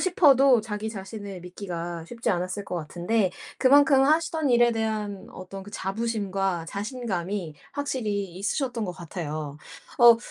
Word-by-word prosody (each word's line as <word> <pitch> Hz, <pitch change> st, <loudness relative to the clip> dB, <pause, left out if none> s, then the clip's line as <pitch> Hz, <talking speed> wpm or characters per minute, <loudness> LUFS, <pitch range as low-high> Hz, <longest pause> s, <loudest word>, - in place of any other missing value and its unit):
싶어도 275 Hz, -, +5 dB
자기 215 Hz, 0 st, -4 dB
자신을 200 Hz, -2 st, -7 dB
믿기가 175 Hz, -2 st, -6 dB
쉽지 230 Hz, +2 st, -2 dB
않았을 185 Hz, +2 st, -2 dB
것 180 Hz, -, -5 dB
같은데 175 Hz, +5 st, 0 dB, 0.3 s
그만큼 275 Hz, +1 st, +6 dB
하시던 315 Hz, -1 st, +2 dB
일에 240 Hz, -1 st, +5 dB
대한 215 Hz, -3 st, -2 dB
어떤 190 Hz, +1 st, -8 dB
그 205 Hz, -, -11 dB
자부심과 195 Hz, -4 st, -1 dB
자신감이 200 Hz, -, -3 dB, 0.2 s
확실히 235 Hz, -8 st, -1 dB
있으셨던 230 Hz, +2 st, -1 dB
것 180 Hz, -, -3 dB
같아요. 155 Hz, -4 st, -5 dB, 0.4 s
어 235 Hz, -1 st, +9 dB
205 Hz, 310 characters per minute, -26 LUFS, 185-240 Hz, 0.4 s, 어